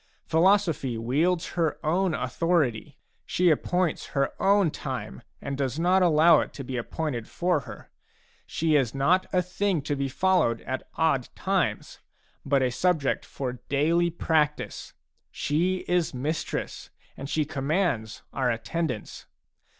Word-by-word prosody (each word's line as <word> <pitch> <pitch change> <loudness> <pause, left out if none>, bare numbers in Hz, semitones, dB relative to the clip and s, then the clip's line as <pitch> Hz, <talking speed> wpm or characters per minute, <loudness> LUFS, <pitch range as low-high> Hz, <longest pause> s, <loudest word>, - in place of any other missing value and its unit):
Philosophy 165 - +2
wields 155 +10 0
her 165 -3 0
own 175 +2 +1
authority; 135 -3 0 0.3
she 180 -1 +2
appoints 180 +2 0
her 140 - +1
own 195 -4 +4
time 65 - -6 0.2
and 140 - -4
does 135 0 -2
not 180 +3 +3
allow 165 -1 +6
it - - -3
to 140 - -7
be 130 0 -5
appointed 125 0 -3
for 175 -3 0
her. 135 - -11 0.6
She 160 -1 +1
is 135 -4 +1
not 175 +8 +2
a 180 -1 +2
thing 180 -3 -1
to 145 0 -1
be 140 -1 -2
followed 160 -7 +2
at 130 +1 -5
odd 155 -6 +1
times, - - -1 0.4
but 140 -1 +2
a 125 - +1
subject 160 0 +1
for 125 -3 -5
daily 165 +5 +2
practice; 155 -3 -1 0.4
she 180 +5 -1
is 175 -6 +1
mistress, 150 +6 -3 0.3
and 135 +1 -7
she 155 -1 0
commands 140 - -1
our 130 -2 0
attendance. 125 +2 -3
155 Hz, 135 wpm, -26 LUFS, 135-175 Hz, 0.6 s, allow